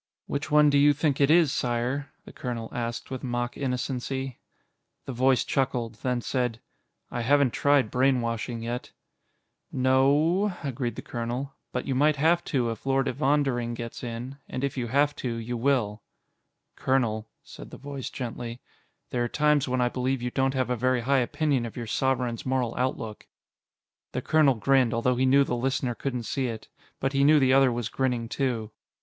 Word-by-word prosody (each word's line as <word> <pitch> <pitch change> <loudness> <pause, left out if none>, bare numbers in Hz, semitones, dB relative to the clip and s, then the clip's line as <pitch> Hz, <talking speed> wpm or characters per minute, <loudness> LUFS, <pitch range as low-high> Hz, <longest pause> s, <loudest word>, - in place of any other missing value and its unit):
"Which 145 +2 -3
one 150 0 +5
do 140 - +4
you 145 +1 +6
think 145 -1 0
it 140 - +5
is, 160 -3 +5
Sire?" 125 +4 -1
the - - -12
colonel 120 -3 -5
asked 120 +1 -4
with 130 - -5
mock 120 -1 -2
innocency. 130 0 -3 0.7
The 135 - -5
voice 130 +1 +3
chuckled, 125 -4 -1
then 125 -1 0
said, 125 -2 -1 0.5
"I 120 - -2
haven't 140 +1 +3
tried 140 -5 +2
brainwashing 120 -3 0
yet." 120 +1 -5 0.8
"No 130 0 +3
o 160 +7 +3
o," 190 -4 -3
agreed 125 -2 -3
the - - -7
colonel, 120 +4 -4 0.2
"but 125 - -3
you 135 - -1
might 150 +3 +3
have 165 +4 +3
to 125 -5 0
if 115 - -8
Lord 135 0 +2
Evondering 135 -3 +1
gets 115 +1 -7
in, 120 +3 -6
and 130 - -4
if 140 - -1
you 125 -3 -2
have 145 +4 +2
to, 120 -3 -3
you 115 +1 -4
will." 115 -4 0 0.7
"Colonel," 115 -5 0
said - - -11
the - - -10
voice 140 -1 -6
gently, 120 -1 -6 0.5
"there 120 - 0
are - - 0
times 150 0 +2
when 130 0 0
I 120 - +2
believe 130 0 -1
you 125 - -2
don't 135 +1 +1
have 130 -2 0
a - - +2
very 130 +1 +1
high 135 +3 +2
opinion 135 +1 0
of 115 0 -7
your 120 - -4
Sovereign's 125 0 0
moral 130 -3 0
outlook." 115 -4 -3 0.9
The - - -3
colonel 150 -4 +4
grinned, 130 0 +3
although 125 +2 +2
he 130 +1 +2
knew 140 +2 +6
the 135 - -2
listener 130 0 -1
couldn't 125 0 -3
see 130 +4 -1
it. 115 -2 -6 0.3
But 135 - -1
he 140 0 +3
knew 150 +1 +6
the 130 -1 +4
other 135 -1 +5
was 120 -2 -2
grinning, 125 -3 -1
too. 115 -6 -2
130 Hz, 185 wpm, -27 LUFS, 120-140 Hz, 0.9 s, you